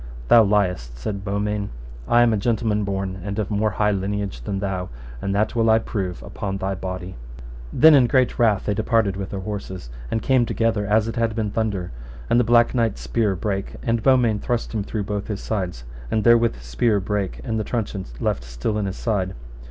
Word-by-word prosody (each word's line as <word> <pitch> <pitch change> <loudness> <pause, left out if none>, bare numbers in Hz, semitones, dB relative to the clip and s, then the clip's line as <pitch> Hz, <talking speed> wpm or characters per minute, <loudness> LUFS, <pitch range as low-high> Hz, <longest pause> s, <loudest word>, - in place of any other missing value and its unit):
Thou 115 -1 +8
liest, 90 - 0
said 100 - -4
Beaumains, 100 0 -2 0.4
I 120 0 +5
am 115 -1 +3
a - - +2
gentleman 110 -1 0
born, 95 -1 -3
and 100 +1 -4
of 105 -2 -2
more 105 +1 +1
high 105 +1 +1
lineage 100 -6 -2
than 95 +11 -3
thou, 95 -2 -3 0.3
and 100 0 -1
that 110 +3 +1
will 115 -1 +3
I 110 - +6
prove 95 -5 -3 0.2
on 95 -1 -1
thy 95 0 -2
body. 95 0 -5 0.6
Then 160 +1 +7
in 130 -4 +6
great 130 +1 +2
wrath 110 -5 +3
they 105 - +1
departed 110 -2 +1
with 95 -1 -5
their 100 - -4
horses, 95 - -6 0.2
and 110 - -1
came 130 -2 +3
together 110 -3 0
as 110 +1 +3
it 115 - -4
had 115 -1 0
been 110 -2 -1
the - - -11
thunder, 100 - -1 0.4
and 120 - +5
the - - +4
Black 120 +1 +4
Knight's 115 - 0
spear 95 - 0
brake, 100 +1 -3
and 115 -1 +1
Beaumains 120 -4 +3
thrust 120 -2 -2
him 110 - -1
through 105 +1 -3
both 100 0 -3
his 105 -2 -3
sides, 90 - -3 0.3
and 110 - 0
therewith 115 0 +5
his - - -13
spear 100 - +1
brake, 100 0 -2
and 110 -3 -2
the - - 0
truncheon 105 -4 -3
left - - -1
still - - -3
in 100 - -1
his 95 - -5
side. 95 -5 -1
105 Hz, 210 wpm, -23 LUFS, 95-115 Hz, 0.6 s, Thou